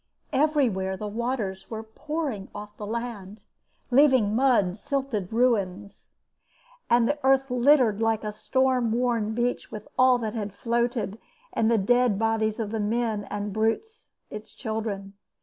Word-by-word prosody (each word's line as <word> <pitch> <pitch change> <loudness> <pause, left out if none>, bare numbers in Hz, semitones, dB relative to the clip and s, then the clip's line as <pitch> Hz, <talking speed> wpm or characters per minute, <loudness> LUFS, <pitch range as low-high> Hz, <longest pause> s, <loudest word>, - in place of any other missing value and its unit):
Everywhere 250 -11 +1
the 210 - -5
waters 210 -4 -3
were 220 -1 -5
pouring 265 -2 -4
off 210 0 -8
the 210 - -7
land, 215 -3 -5 0.5
leaving 255 -6 +4
mud 235 -8 +3
silted 270 -9 -2
ruins, 205 -5 0 0.8
and 235 0 +4
the 290 +3 0
earth 270 0 +3
littered 250 -4 +4
like 225 -1 +1
a 210 - -3
storm 250 +1 +1
worn 230 -3 0
beach 245 +1 -1
with 210 -1 -8
all 255 -1 +6
that 220 -3 -3
had 210 -4 -4
floated, 235 -2 -1 0.3
and 225 -1 +2
the 230 - +4
dead 245 +1 +3
bodies 220 0 0
of 215 -2 -3
the 225 - -2
men 215 0 -1
and 205 -1 -4
brutes, 225 - -2 0.2
its 215 0 -8
children. 215 -4 -4
225 Hz, 145 wpm, -26 LUFS, 210-250 Hz, 0.8 s, all